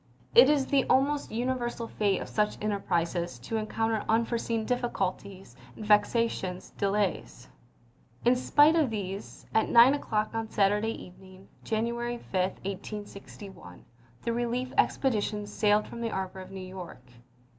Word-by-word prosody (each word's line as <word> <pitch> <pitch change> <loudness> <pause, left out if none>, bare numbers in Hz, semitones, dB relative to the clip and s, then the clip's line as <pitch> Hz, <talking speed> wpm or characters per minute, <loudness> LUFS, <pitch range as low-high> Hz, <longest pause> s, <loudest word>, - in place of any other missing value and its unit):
It 255 +3 +8
is 290 -3 +3
the 275 -1 +2
almost 280 +3 +2
universal 240 0 -2
fate 200 -4 0
of - - -10
such 210 -1 0
enterprises 175 - -1
to 175 - -4
encounter 220 0 -1
unforeseen 230 0 0
difficulties 200 - -3 0.2
and 215 - -8
vexatious 210 -3 +1
delays. 200 -10 -2 0.8
In 245 +1 +5
spite 290 +5 +4
of 310 -6 +3
these, 200 -2 -6
at 220 - +2
9 240 +3 +7
o'clock 215 -7 -1
on 225 -1 -3
Sat 195 -2 +3
urday 215 +2 -1
evening, 185 +1 -14
January 235 +2 -2
5, - - -18
1861, 195 - -5 0.4
the 235 - -1
relief 240 +2 -2
expedi 250 -6 +2
tion 210 0 -3
sailed 210 0 +2
from 235 - -8
the 230 - -1
harbor 190 -2 -4
of 185 - -9
New 190 -1 -8
York. 185 -8 -9
215 Hz, 140 wpm, -28 LUFS, 195-235 Hz, 0.8 s, It